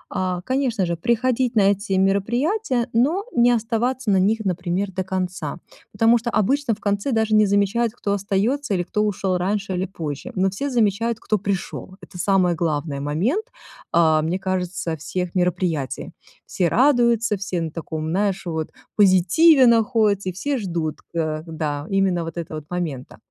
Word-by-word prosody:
А, 185 -2 -1
конечно 250 -3 0
же, 170 0 -1
приходить 235 +5 0
на 200 -2 +5
эти 200 0 -3
мероприятия, 240 - +1
но 300 - +2
не 240 0 +4
оставаться 235 +1 0
на 190 - +4
них, 215 +4 +2
например, 185 +1 -1
до 190 0 -3
конца. 185 -4 -3 0.3
Потому 225 +3 +4
что 235 +1 -3
обычно 235 +3 +1
в 215 - -22
конце 205 +6 -1
даже 220 -1 +1
не 215 -1 +5
замечают, 205 +3 +1
кто 205 -4 -2
остается, 205 +6 0
или 175 - 0
кто 210 +4 -2
ушел 190 -3 0
раньше, 195 +1 -1
или 180 +1 -1
позже. 155 -7 -6
Но 190 0 +1
все 280 +9 -3
замечают, 230 -1 +1
кто 215 -2 -1
пришел. 190 -1 -4
Это 180 - -12
самое 180 -2 +2
главное 150 -3 -2
момент, 190 - 0 0.5
а, 160 -2 +4
мне 165 +4 -1
кажется, 180 -3 -3
всех 180 +3 -4
мероприятий. 175 -7 -1 0.3
Все 175 - 0
радуются, 235 - +3
все 185 -3 -3
на 160 - -3
таком, 160 -1 -5
знаешь, 195 +2 0
вот 160 -2 -3 0.3
позитиве 210 - +5
находятся, 220 -4 +3
и - - -2
все 275 +9 -2
ждут, 170 -6 -3 0.2
э, 155 -2 -1
да, 150 -2 -3
именно 195 -3 +1
вот 165 +1 -7
этого 160 -2 -5
вот 150 - -19
момента. 165 -8 -4
195 Hz, 165 wpm, -22 LUFS, 175-230 Hz, 0.5 s, на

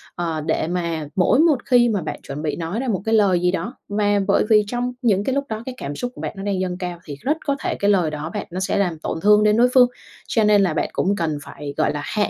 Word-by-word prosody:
ờ, 165 -3 -2
để 155 0 -1
mà 170 -3 -2
mỗi 190 +8 +3
một 315 -3 +5
khi 245 -2 +4
mà 205 -4 0
bạn 155 - -5
chuẩn 140 +2 -6
bị 155 -1 -2
nói 170 +6 -3
ra 265 - -3
một 195 -5 -1
cái 225 0 +2
lời 195 -5 +4
gì 180 0 +2
đó, 230 +7 -4
mà 205 0 +1
bởi 200 - +3
vì 215 -1 +6
trong 245 +2 -2
những 205 -5 +2
cái 265 +4 -1
lúc 280 - 0
đó 220 0 -4
cái 260 - -6
cảm 140 +1 -5
xúc 245 +10 -4
của - - -9
bạn - - -4
nó 195 - -7
đang 200 -2 -1
dâng 180 -1 -2
cao 180 -2 -5
thì 145 - -7
rất 300 +4 0
có 280 - +1
thể - - -2
cái 200 - +2
lời 175 -6 +2
đó 150 +1 -5
bạn - - -3
nó 180 - -4
sẽ 190 - -1
làm 175 -5 0
tổn 160 - -4
thương 210 +2 +5
đến 210 0 +3
đối 240 +1 +5
phương. 250 -2 +7 0.4
Cho 225 - +1
nên 210 -1 +5
là 185 -5 +1
bạn 155 - -1
cũng 200 +2 +1
cần 160 -6 -1
phải, 145 0 -8
gọi - - +1
là, 145 - -3
hạ 210 -1 0
200 Hz, 295 wpm, -21 LUFS, 170-225 Hz, 0.4 s, phương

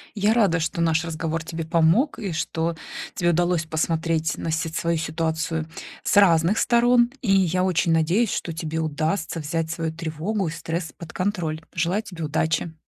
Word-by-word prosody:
Я 210 +1 +3
рада, 200 -8 +3
что 165 +1 -2
наш 165 -1 +2
разговор 165 0 -3
тебе 165 0 -5
помог, 165 - +3
и 195 -5 -3
что 165 +1 -1 0.4
тебе 175 -1 +2
удалось 175 0 +1
посмотреть 160 0 0
на 165 - -3
си 160 +1 -1
свою 165 +1 -1
ситуацию 160 0 -2 0.4
с - - +1
разных 180 +1 +5
сторон. 240 0 +4
И 205 -6 +1
я 185 -2 +3
очень 175 -2 +2
надеюсь, 175 +8 +2
что 170 - -3
тебе 160 -1 -4
удастся 160 +2 -1
взять 160 +1 -2
свою 165 -1 -2
тревогу 165 +5 -2
и - - -2
стресс 165 0 -4
под 170 -2 -10
контроль. 175 -5 -2
Желаю 180 +5 0
тебе 175 -6 -6
удачи. 160 +2 0
165 Hz, 170 wpm, -24 LUFS, 160-180 Hz, 0.4 s, разных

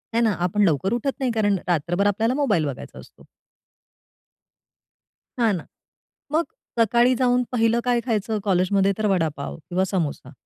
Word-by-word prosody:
हे 235 - +3
ना? 225 -2 +3
आपण 205 +4 +1
लवकर 185 - +1
उठत 255 +3 -1
नाही. 260 -3 0
कारण 205 -3 +1
रात्रभर 175 +3 +1
आपल्याला 220 +4 +1
मोबाईल 210 - +1
बघायचा 140 -3 -7
असतो. - - -16 2.2
हां 225 -3 +3
ना. 170 - -6 0.7
मग 320 +2 +2 0.4
सकाळी 240 +3 +4
जाऊन 250 0 +2
पहिलं 230 -1 +2
काय 245 -1 +2
खायचं 220 -2 -1
कॉलेजमध्ये 195 +1 +2
तर 215 - 0
वडापाव 160 -7 -1
किंवा 185 +1 +1
समोसा. 175 -7 -3
210 Hz, 145 wpm, -23 LUFS, 180-235 Hz, 2.2 s, सकाळी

